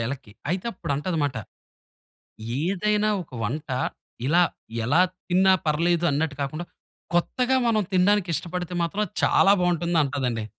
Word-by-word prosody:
ఎలక్కి. 130 -5 -6 0.2
అయితే 185 +5 -2
అప్పుడు 160 - -4
అంటదిమాట, 145 -5 -1 1.3
"ఏదైనా 210 +4 +1
ఒక 150 - -25
వంట 145 +8 -3 0.6
ఇలా 170 +5 +4 0.4
ఎలా 145 +9 +4 0.3
తిన్నా 190 +1 +5
పర్లేదు 170 +3 +2
అన్నట్టు 145 +1 -1
కాకుండా, 155 +5 -3 0.5
కొత్తగా 250 +9 +1
మనం 220 -2 +3
తినడానికి 185 0 +3
ఇష్టపడితే 180 +2 -4
మాత్రం 200 +5 -1 0.2
చాలా 195 - +5
బాగుంటుందంటాదండి." 145 -9 0
170 Hz, 115 wpm, -25 LUFS, 145-185 Hz, 1.3 s, తిన్నా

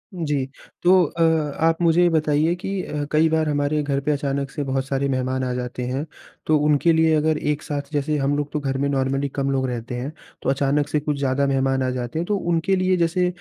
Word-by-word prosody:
जी। 145 -6 -1 0.4
तो 185 0 +6
अ, 165 +2 -3 0.4
आप 165 0 +3
मुझे 170 +1 +4
ये 175 - +5
बताइए 155 +1 +2
कि 190 +1 -3
अ, 145 -1 -3
कई 155 +1 +4
बार 160 -1 +1
हमारे 145 +1 0
घर 140 -1 0
पे 150 - 0
अचानक 140 -1 -2
से 145 - -3
बहुत 135 -1 -1
सारे 140 0 0
मेहमान 130 0 -1
आ 125 - -1
जाते 125 0 -4
हैं, 135 +5 -2 0.4
तो 155 -1 +3
उनके 150 +3 +3
लिए 160 0 +3
अगर 155 0 +2
एक 150 0 -1
साथ 145 0 -5
जैसे 150 +1 0
हम 140 +1 +1
लोग 145 0 -3
तो 150 - -1
घर 135 -1 -2
में 140 +1 0
नॉर्मली 135 +1 0
कम 140 -1 0
लोग 130 -1 0
रहते 120 0 -4
हैं, 130 +5 -4 0.3
तो - - -1
अचानक 140 +2 +1
से 150 0 0
कुछ 145 -1 -2
ज़्यादा 140 0 +1
मेहमान 135 -1 +1
आ 130 - 0
जाते 125 +4 -3
हैं 170 - -1
तो 205 +1 0
उनके 175 +2 0
लिए 185 0 +2
जैसे 175 +2 +1
145 Hz, 235 wpm, -22 LUFS, 135-160 Hz, 0.4 s, तो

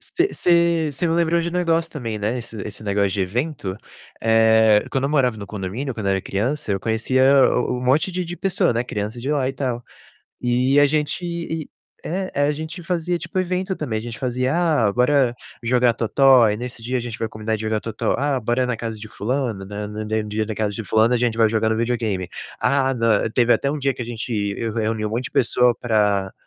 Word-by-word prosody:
Você 370 +3 -1
você 170 -3 +2
você 145 +6 -1
me 165 - +1
lembrou 170 0 +2
de 170 - -2
um - - -6
negócio 165 -2 +1
também, 115 -7 -4
né, 110 +4 -1
esse 115 -1 -8
esse 105 +1 -9
negócio 100 -1 +1
de 95 - -2
evento. 105 - -2 0.4
Eh, 110 -1 +4
quando 135 0 -1
eu 140 - 0
morava 125 -6 +2
no 100 -2 -7
condomínio, 110 +7 -4
quando 105 -3 -3
era 95 0 +1
criança, 110 +4 -2
eu 95 - -1
conhecia 120 +4 +1 0.3
o 125 0 0
o - - -3
um 125 - -5
monte 140 +9 +2
de 180 0 -2
de 175 +1 -6
pessoa, 190 -10 +1
né, 115 - 0
criança 110 0 -4
de 135 - -3
lá 140 -4 +1
e - - -2
tal, 125 -3 -3 0.6
e 125 +3 +2
a 145 - +7
gente 150 +4 -1
e 165 -2 -4 0.4
é, 185 +3 -3
aí 145 +1 +2
a - - +2
gente 160 +4 -6
fazia 175 0 -1
tipo 185 +2 -4
evento 185 +1 -1
também, 110 - -3
a - - -9
gente 120 -1 -7
fazia: 130 +1 -1
"Ah, 150 -12 +2
bora 125 +1 +3 0.3
jogar 120 0 +3
totó?". 130 +3 +5
Aí 105 -2 +3
nesse 125 0 -7
dia, 125 +3 -2
a - - 0
gente 120 -1 -5
vai 110 - -3
combinar 110 +1 -3
de 110 - -4
jogar 110 0 0
Totó. 115 -1 -2
"Ah, 140 -2 0
bora 120 +3 0
na 125 - -1
casa 110 -1 -5
de 110 - -8
fulano?" 115 -2 -3
Né, 105 +1 -6
hum, - - -8
no 105 +1 -5
dem 110 0 -1
dia 105 +1 -1
na 110 - -4
casa 105 -1 -1
de 115 - -4
fulano 110 +3 +3
a - - +4
gente 115 -1 0
vai 110 -1 +5
jogar 110 0 +1
no 110 - +1
videogame. 115 -6 -1 0.3
Ah, 135 +1 +2
nã 115 -3 +1
teve 120 0 +4
até 140 - +1
um 150 - -3
dia 135 -1 0
que 125 - -5
a - - -5
gente 120 +1 -5 0.3
eu 115 -1 -2
reuni 110 -1 -1
um - - -4
monte 120 +4 -2
de - - -9
pessoa 125 0 +3
pra 105 -4 +1
120 Hz, 240 wpm, -22 LUFS, 110-145 Hz, 0.6 s, a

